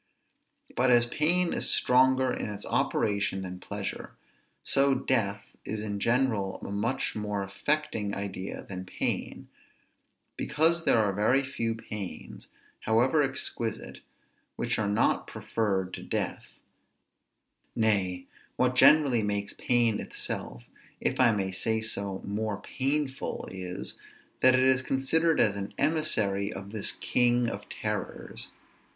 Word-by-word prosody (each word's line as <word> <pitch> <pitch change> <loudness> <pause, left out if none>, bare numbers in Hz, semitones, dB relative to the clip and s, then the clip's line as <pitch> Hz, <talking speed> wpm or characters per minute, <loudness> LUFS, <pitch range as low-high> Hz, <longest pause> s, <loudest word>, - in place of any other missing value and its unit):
But 125 +1 +3
as 120 -1 +5
pain 170 +7 +2
is - - +2
stronger 130 0 +4
in - - -3
its 105 -1 -6
operation 100 -2 0
than 90 0 -6
pleasure, - - -5 0.5
so 135 0 +3
death 105 -7 -1
is 105 0 -4
in 105 -1 -3
general 115 -4 +1
a - - -5
much 110 +6 -1
more 105 -2 -2
affecting 105 0 -2
idea 95 -1 -5
than 95 -1 -6
pain; - - -3 0.9
because 165 +2 +2
there - - +5
are 105 -3 +2
very 110 +7 +2
few 115 -4 -2
pains, 105 -4 -7 0.3
however 120 +8 +3
exquisite, 135 -4 -2 0.6
which - - -1
are 105 -2 0
not 105 - +1
preferred 95 -5 -2
to - - -6
death: - - -3 1.3
nay, 95 -5 +1 0.3
what 125 0 +1
generally 140 -4 +6
makes 100 -1 -2
pain 120 -3 +2
itself, - - -5 0.4
if - - -1
I 125 -2 +6
may 95 -3 -1
say 110 +4 0
so, 100 -3 -3
more 105 0 -2
painful, 135 +4 -2
is, 90 -1 -6 0.4
that 130 0 +7
it 130 - +3
is 130 -1 +4
considered 155 +5 +1
as 105 -2 +3
an 100 0 -5
emissary 110 -10 +1
of 100 +1 -8
this 105 -2 -1
king 120 -1 +2
of 105 -2 -5
terrors. 105 -1 -4
110 Hz, 130 wpm, -28 LUFS, 100-130 Hz, 1.3 s, that